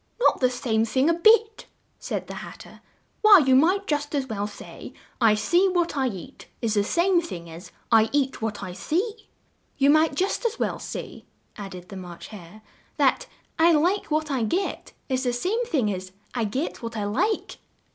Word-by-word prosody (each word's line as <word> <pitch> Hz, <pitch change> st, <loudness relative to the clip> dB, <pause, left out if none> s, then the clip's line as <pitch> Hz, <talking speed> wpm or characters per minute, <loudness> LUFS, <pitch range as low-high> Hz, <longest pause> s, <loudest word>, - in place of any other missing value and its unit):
"Not 485 Hz, -, +3 dB
the 255 Hz, -, +3 dB
same 235 Hz, -3 st, 0 dB
thing 260 Hz, +7 st, +2 dB
a -, -, +2 dB
bit!" 440 Hz, +5 st, +3 dB, 0.3 s
said -, -, -4 dB
the -, -, -8 dB
Hat -, -, -10 dB
ter. -, -, -14 dB, 0.4 s
"Why, 430 Hz, -2 st, +9 dB
you 265 Hz, -6 st, +4 dB
might 365 Hz, +9 st, +3 dB
just 295 Hz, -2 st, -2 dB
as 275 Hz, -2 st, 0 dB
well 205 Hz, -4 st, -3 dB
say, 210 Hz, -, -11 dB, 0.3 s
'I 220 Hz, -2 st, +5 dB
see 350 Hz, -, +2 dB
what 350 Hz, -3 st, 0 dB
I 270 Hz, -2 st, +1 dB
eat' 190 Hz, -8 st, -8 dB
is 225 Hz, -3 st, -1 dB
the 205 Hz, -2 st, +2 dB
same 345 Hz, -, +2 dB
thing 170 Hz, -, -8 dB
as 170 Hz, +4 st, -11 dB, 0.2 s
'I 225 Hz, -1 st, +5 dB
eat 275 Hz, -3 st, 0 dB
what 220 Hz, -2 st, -3 dB
I 180 Hz, -, -6 dB
see'!" 410 Hz, -, -3 dB, 0.5 s
"You 280 Hz, +1 st, +5 dB
might 310 Hz, -1 st, +3 dB
just 380 Hz, -, -1 dB
as 470 Hz, 0 st, -1 dB
well -, -, -2 dB
say," -, -, -7 dB, 0.3 s
added 185 Hz, -3 st, -9 dB
the 195 Hz, -, -8 dB
March 180 Hz, -2 st, -9 dB
Hare, 210 Hz, 0 st, -12 dB, 0.3 s
that -, -, +2 dB, 0.3 s
'I 335 Hz, +1 st, +6 dB
like 350 Hz, +7 st, +2 dB
what 305 Hz, -1 st, -1 dB
I 265 Hz, -3 st, 0 dB
get' 350 Hz, -, -2 dB
is 260 Hz, -1 st, -1 dB
the 245 Hz, -1 st, 0 dB
same 385 Hz, -, -1 dB
thing 245 Hz, -, 0 dB
as 185 Hz, 0 st, -7 dB, 0.2 s
'I 235 Hz, -3 st, -1 dB
get 255 Hz, +10 st, -3 dB
what 230 Hz, -1 st, -6 dB
I 210 Hz, -, -2 dB
like'!" 250 Hz, -, -1 dB
265 Hz, 195 wpm, -25 LUFS, 215-345 Hz, 0.5 s, Why